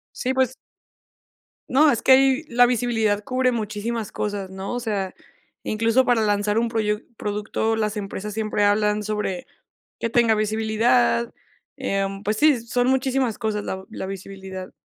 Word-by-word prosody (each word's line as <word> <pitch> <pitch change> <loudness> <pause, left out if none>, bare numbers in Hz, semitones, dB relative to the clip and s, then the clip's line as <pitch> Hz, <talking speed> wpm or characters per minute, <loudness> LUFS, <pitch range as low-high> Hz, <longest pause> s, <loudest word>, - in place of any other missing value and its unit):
Sí, 260 +1 -1
pues 260 -1 +1 1.1
No, 295 +4 +5
es 230 - -2
que 265 - +6
ahí 270 +2 +5
la 245 +1 +5
visibilidad 225 -4 +1
cubre 255 +1 +1
muchísimas 220 0 -3
cosas, 205 -2 -3
¿no? 190 +5 -5
O 245 - -2
sea, 205 -5 -2 0.5
incluso 230 +4 +2
para 245 -3 +3
lanzar 205 +1 +1
un 235 - +1
proyuc 215 -1 -1
producto, 210 +2 -1
las 215 -1 -1
empresas 205 0 -5
siempre 215 -1 0
hablan 210 +1 +2
sobre 210 -4 -3 0.5
que 230 - -1
tenga 230 -2 +4
visibilidad, 220 +2 +1 0.4
em, 195 0 -2
pues 215 +1 -1
sí, 295 -5 +4
son 245 +1 0
muchísimas 260 -3 +1
cosas 215 -3 -2
la 190 0 -5
la 215 - -6
visibilidad. 190 -1 -8
220 Hz, 150 wpm, -23 LUFS, 205-245 Hz, 1.1 s, que